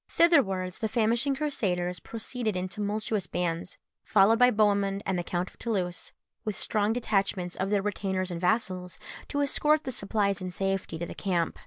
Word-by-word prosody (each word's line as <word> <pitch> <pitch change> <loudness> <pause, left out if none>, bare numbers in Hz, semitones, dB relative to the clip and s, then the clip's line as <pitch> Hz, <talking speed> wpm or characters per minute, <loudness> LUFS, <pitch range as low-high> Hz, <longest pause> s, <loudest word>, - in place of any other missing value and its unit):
Thitherwards 195 - +3
the 220 - 0
famishing 235 +5 +1
Crusaders 180 -12 -1
proceeded 225 -2 -4
in 180 +1 -2
tumultuous 210 +1 -2
bands, 175 0 -3 0.3
followed 215 +2 +4
by 250 0 +7
Bohemund 200 -2 +2
and 190 - 0
the 175 - -1
Count 175 +1 -2
of - - -26
Toulouse, 185 -6 -2 0.3
with 215 -2 -2
strong 210 -1 +2
detachments 195 -6 0
of 190 +1 -2
their 200 -1 +1
retainers 190 -3 -2
and 170 -1 -4
vassals, 185 -3 0 0.3
to 285 - -1
escort 300 +2 +2
the 260 - -4
supplies 200 -3 -1
in 185 - -3
safety 195 -2 -2
to 170 - -3
the - - -7
camp. 175 -4 -1
200 Hz, 170 wpm, -28 LUFS, 185-225 Hz, 0.3 s, by